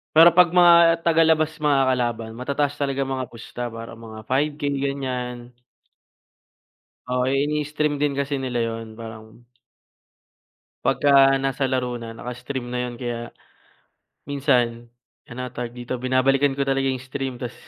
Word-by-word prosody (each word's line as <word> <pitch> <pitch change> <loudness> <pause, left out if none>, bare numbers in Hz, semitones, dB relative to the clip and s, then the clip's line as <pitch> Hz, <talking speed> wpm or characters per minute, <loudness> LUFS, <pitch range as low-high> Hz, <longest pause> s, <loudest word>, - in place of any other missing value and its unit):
Pero 165 +2 +9
'pag 180 -2 +6
mga 170 -1 +6
tagalabas 160 -1 +3
makakalaban, 125 -6 +1
matataas 140 +2 -1
talaga 140 -1 0
mga 130 -2 -3
pusta. 120 +1 -9
Parang 115 0 -9
mga 110 -1 -10
5K, 145 +3 0
ganyan. 125 -3 -4 1.6
Oo, 125 0 0
inii-stream 150 +2 0
din 145 0 +1
kasi 140 0 -1
nila 130 -3 -2
yun. 115 -1 -6
Parang 110 +1 -11 1.4
Pagka 135 -1 +5
nasa 135 0 0
laro 125 -2 -1
na, 115 -1 -8
naka-stream 125 +1 -6
na 125 0 -2
yun. 120 - -9
Kaya 120 -1 -5 1.0
minsan, 120 -4 0 0.3
ano 120 - -11
nga 120 - -21
tawag 120 - -7
dito, 125 +1 -5
binabalikan 130 +2 +2
ko - - -4
talaga 135 0 +1
'yung 130 -1 -2
stream, 130 -1 -5
tas 120 -3 -5
130 Hz, 130 wpm, -23 LUFS, 120-140 Hz, 1.6 s, Pero